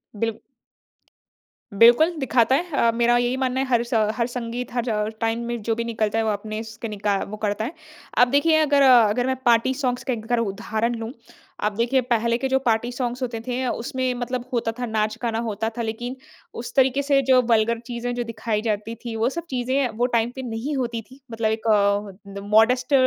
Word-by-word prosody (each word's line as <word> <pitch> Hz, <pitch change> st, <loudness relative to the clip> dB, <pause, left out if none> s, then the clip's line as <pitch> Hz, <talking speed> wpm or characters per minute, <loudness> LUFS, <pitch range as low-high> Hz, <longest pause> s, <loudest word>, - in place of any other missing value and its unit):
Bill 225 Hz, +1 st, -2 dB, 1.3 s
बिल्कुल 240 Hz, -, +6 dB
दिखाता 260 Hz, -1 st, +3 dB
है 345 Hz, +4 st, -2 dB
अ, 235 Hz, -4 st, +3 dB
मेरा 240 Hz, +1 st, +3 dB
यही 245 Hz, +2 st, 0 dB
मानना 260 Hz, 0 st, 0 dB
है 270 Hz, -, +1 dB
हर 240 Hz, -2 st, +2 dB
स 240 Hz, +1 st, -7 dB, 0.2 s
हर 235 Hz, -, +1 dB
संगीत 245 Hz, 0 st, -5 dB
हर 220 Hz, -3 st, -1 dB
टाइम 225 Hz, 0 st, 0 dB
में 235 Hz, -1 st, -3 dB
जो 225 Hz, +2 st, 0 dB
भी 235 Hz, -, -2 dB
निकलता 220 Hz, -1 st, -1 dB
है 225 Hz, -, +2 dB
वो 220 Hz, -, +1 dB
अपने 215 Hz, +1 st, -4 dB
इसके 220 Hz, +1 st, -7 dB
निका 205 Hz, -1 st, -1 dB
वो 215 Hz, -, -6 dB
करता 210 Hz, 0 st, -1 dB
है। 300 Hz, -, -5 dB, 0.4 s
अब 245 Hz, +1 st, +6 dB
देखिए 315 Hz, +3 st, +4 dB
अगर 285 Hz, -2 st, +3 dB
अगर 245 Hz, -2 st, +5 dB
मैं 260 Hz, -, +1 dB
पार्टी 240 Hz, +2 st, +4 dB
सॉन्ग्स 255 Hz, -2 st, -2 dB
के 260 Hz, -, -1 dB
एक 220 Hz, -2 st, -5 dB
अगर 240 Hz, +1 st, +1 dB
उदाहरण 220 Hz, +2 st, -1 dB
लूँ। 230 Hz, +1 st, -5 dB, 0.5 s
आप 210 Hz, -, +2 dB
देखिए 240 Hz, +4 st, +1 dB
पहले 235 Hz, -1 st, +1 dB
के 265 Hz, +2 st, -1 dB
जो 265 Hz, -, +3 dB
पार्टी 235 Hz, +1 st, +1 dB
सॉन्ग्स 245 Hz, 0 st, -3 dB
होते 240 Hz, -3 st, -3 dB
थे 250 Hz, +1 st, -1 dB
अ, 255 Hz, -, 0 dB
उसमें 255 Hz, +2 st, -2 dB
मतलब 245 Hz, 0 st, -4 dB
होता 230 Hz, -1 st, 0 dB
था 245 Hz, -, -1 dB
नाच-गाना 220 Hz, +1 st, -1 dB
होता 215 Hz, +2 st, -2 dB
था 235 Hz, -, -1 dB
लेकिन 240 Hz, +3 st, -4 dB, 0.4 s
उस 235 Hz, -, -7 dB
तरीके 265 Hz, 0 st, +3 dB
से 275 Hz, -1 st, +3 dB
जो 255 Hz, -1 st, +7 dB
वल्गर 225 Hz, +1 st, +3 dB
चीज़ें 245 Hz, 0 st, -4 dB
जो 240 Hz, -, -1 dB
दिखाई 220 Hz, -2 st, -3 dB
जाती 220 Hz, 0 st, -2 dB
थी 230 Hz, -, -4 dB
वो 225 Hz, +3 st, +1 dB
सब 340 Hz, +4 st, -6 dB
चीज़ें 260 Hz, +1 st, 0 dB
वो 245 Hz, -, +2 dB
टाइम 235 Hz, +1 st, +1 dB
पे 265 Hz, -, -5 dB
नहीं 245 Hz, +4 st, -4 dB
होती 235 Hz, -3 st, -2 dB
थी। 270 Hz, -, -15 dB
मतलब 225 Hz, -1 st, 0 dB
एक 220 Hz, +1 st, -3 dB, 0.7 s
द -, -, -4 dB
मॉडेस्ट 250 Hz, +5 st, +3 dB
235 Hz, 210 wpm, -23 LUFS, 225-255 Hz, 1.3 s, जो